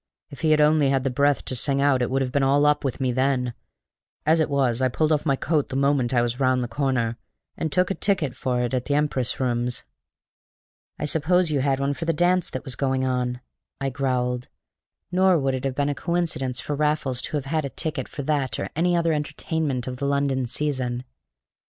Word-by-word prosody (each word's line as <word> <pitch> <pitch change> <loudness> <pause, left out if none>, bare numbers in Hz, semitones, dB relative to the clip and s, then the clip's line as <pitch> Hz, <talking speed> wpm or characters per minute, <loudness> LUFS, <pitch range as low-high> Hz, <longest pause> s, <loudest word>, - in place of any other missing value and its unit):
If 140 - -10
he 160 - +2
had 155 0 +4
only 150 -2 +4
had 135 -1 +1
the 135 - 0
breath 140 +2 +2
to 130 - -2
sing 140 +2 +1
out 140 -2 +3
it 125 - 0
would 135 +1 +1
have 125 - -3
been 140 - +1
all 140 +2 +3
up 150 0 +3
with 135 -1 -2
me 130 -2 +1
then; 130 -1 0 0.7
as 160 +2 +4
it 155 - +1
was 130 -4 +1
I 130 - +4
pulled 155 +5 0
off 150 +1 +1
my 140 - +3
coat 150 +1 0
the 130 - -5
moment 140 -3 +2
I 120 -2 +3
was 120 +1 -2
round 130 -1 +2
the - - -3
corner, 125 -4 -1 0.4
and 160 - -3
took 180 +2 +2
a - - +2
ticket 190 -11 0
for 125 -1 -1
it 120 +1 -2
at 125 -1 -1
the 145 - 0
Empress 145 -4 0
Rooms." 120 -1 -1 1.1
"I - - -3
suppose 160 +3 +2
you 145 - +1
had 135 0 +1
one 140 +1 0
for 165 - -5
the 165 - +1
dance 175 +2 +2
that 130 - -5
was 130 - -2
going 130 0 0
on," 125 -1 -1 0.4
I 135 0 -1
growled. 125 -2 -1 0.6
Nor 185 0 +4
would 135 -3 0
it 130 0 -3
have 135 -1 -1
been 145 0 +1
a 145 - 0
coincidence 155 -6 -1
for 145 - -4
Raffles 150 -4 0
to 150 - -2
have 145 - -4
had 155 +2 -1
a 140 - -3
ticket 155 +3 -4
for 145 - -6
that 140 -2 0
or - - -4
any 175 +2 +2
other 165 -1 +2
entertainment 150 -3 -2
of 125 -1 -5
the 140 - -2
London 140 -2 0
season. 125 -2 -2
140 Hz, 225 wpm, -24 LUFS, 130-150 Hz, 1.1 s, had